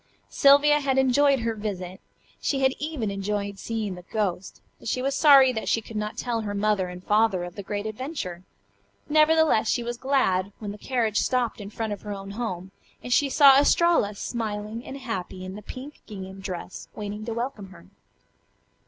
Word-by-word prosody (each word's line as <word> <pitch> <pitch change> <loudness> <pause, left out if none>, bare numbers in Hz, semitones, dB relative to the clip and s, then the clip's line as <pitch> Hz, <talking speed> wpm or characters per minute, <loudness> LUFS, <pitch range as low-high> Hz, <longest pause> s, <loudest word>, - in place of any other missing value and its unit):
Sylvia 285 +1 +5
had 270 -2 0
enjoyed 265 +1 +4
her 230 0 -1
visit. 190 -4 -5 0.4
She 270 -2 0
had 265 0 +4
even 290 -9 -3
enjoyed 200 0 -3
seeing 220 -4 -3
the 180 - -9
"ghost," 190 -1 -3 0.2
but - - -10
she 255 - 0
was 270 +2 0
sorry 275 -3 +7
that 220 - -3
she - - +2
could 225 0 -11
not 210 0 -3
tell 235 -2 -2
her 205 -1 -4
mother 205 -2 +1
and 180 0 -9
father 210 -3 +2
of 175 -1 -7
the 200 - -7
great 205 +1 -4
adventure. 215 - -5 0.7
Nevertheless 310 -6 +4
she 240 - +1
was 240 0 -4
glad 205 -8 +1
when 210 -2 -6
the 205 - -10
carriage 230 -5 0
stopped 245 -4 0
in 200 - -7
front 220 0 -3
of 200 - -8
her 210 - -5
own 195 0 -7
home, 190 -4 -4 0.3
and 245 - -1
she 285 +1 +3
saw 275 -1 +7
Estralla, 290 -8 +3
smiling 215 0 -4
and 270 - -7
happy 190 -7 -5
in 185 - -6
the 210 - -8
pink 260 +7 -9
gingham 190 -2 -8
dress, 185 -2 -7
waiting 210 0 -5
to 230 - -3
welcome 235 -5 -4
her. 175 - -15
220 Hz, 190 wpm, -25 LUFS, 200-265 Hz, 0.7 s, sorry